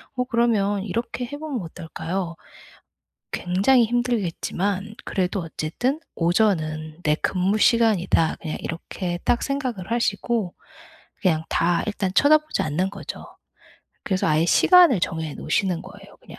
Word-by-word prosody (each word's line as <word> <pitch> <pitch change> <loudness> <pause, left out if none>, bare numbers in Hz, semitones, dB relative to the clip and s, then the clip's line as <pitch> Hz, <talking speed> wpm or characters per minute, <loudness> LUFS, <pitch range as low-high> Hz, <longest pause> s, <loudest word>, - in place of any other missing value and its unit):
뭐 250 0 0
그러면 220 -5 +1
이렇게 230 +4 -3
해 275 +4 -7
보면 295 -6 -4
어떨까요? 170 +1 -5 1.0
굉장히 200 +8 +3
힘들겠지만 210 -3 -1
그래도 185 0 -1
어쨌든 165 - -2 0.2
'오전은 160 -4 0
내 150 0 +3
근무 185 +5 0
시간이다.' 210 -8 +3
그냥 155 -2 -4
이렇게 175 +1 -4
딱 240 - +2
생각을 255 -9 -3
하시고 230 -3 0 0.7
그냥 160 -5 +2
다 170 0 +1
일단 205 -3 -1
쳐다보지 305 +1 +4
않는 160 +5 -1
거죠. 200 0 -8 0.8
그래서 190 -1 0
아예 155 +1 +3
시간을 345 - +6
정해 160 -3 -2
놓으시는 185 -4 -1
거예요 - - -14
그냥. - - -14
195 Hz, 300 characters per minute, -23 LUFS, 170-235 Hz, 1.0 s, 시간을